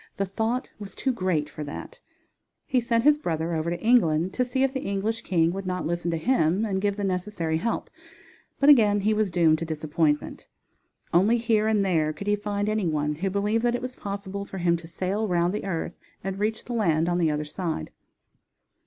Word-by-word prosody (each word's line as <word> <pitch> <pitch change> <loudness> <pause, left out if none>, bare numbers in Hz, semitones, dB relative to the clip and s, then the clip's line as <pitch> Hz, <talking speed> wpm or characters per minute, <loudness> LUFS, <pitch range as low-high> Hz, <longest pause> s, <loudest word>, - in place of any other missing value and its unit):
The 195 - 0
thought 225 +6 -1
was 200 -2 -8
too 265 - 0
great 185 -9 0
for 150 - -7
that. 310 - -8 0.7
He 255 -2 +1
sent 230 -1 +1
his 300 +1 +5
brother 165 - -2
over 160 +1 -1
to 170 0 -3
England 185 -7 +3
to 250 - +1
see 255 +2 0
if 270 0 +1
the 265 - -1
English 200 +3 -2
king 165 -3 +2
would 195 0 -5
not 180 0 -2
listen 175 +1 -1
to 165 - 0
him 185 -1 +2
and 190 -3 -1
give 200 0 +1
the 205 - -4
necessary 180 -4 -1
help, 230 +8 -2 0.7
but 280 - +3
again 215 -8 +6
he 215 +2 +2
was 215 -2 +1
doomed 165 -3 +3
to 165 - -3
disappointment. 155 -1 -1 0.7
Only 200 +8 +4
here 225 -2 +2
and 210 -2 +2
there 160 -4 +1
could 200 - -8
he 205 0 +2
find 205 0 -2
any 215 -3 0
one 150 -1 0
who 185 +6 -2
believed 205 +3 0
that 240 0 +2
it - - -3
was 255 0 -5
possible 200 0 -5
for 195 - -8
him 170 -1 +2
to 165 0 -11
sail 190 +5 -2
round 175 -1 +1
the 210 - -3
earth 170 -3 -3 0.2
and 195 +1 -4
reach 220 +1 -1
the 245 - -5
land 165 -8 +2
on 175 0 +1
the 165 -2 +3
other 150 0 -1
side. 155 - -4
195 Hz, 215 wpm, -26 LUFS, 165-220 Hz, 0.7 s, again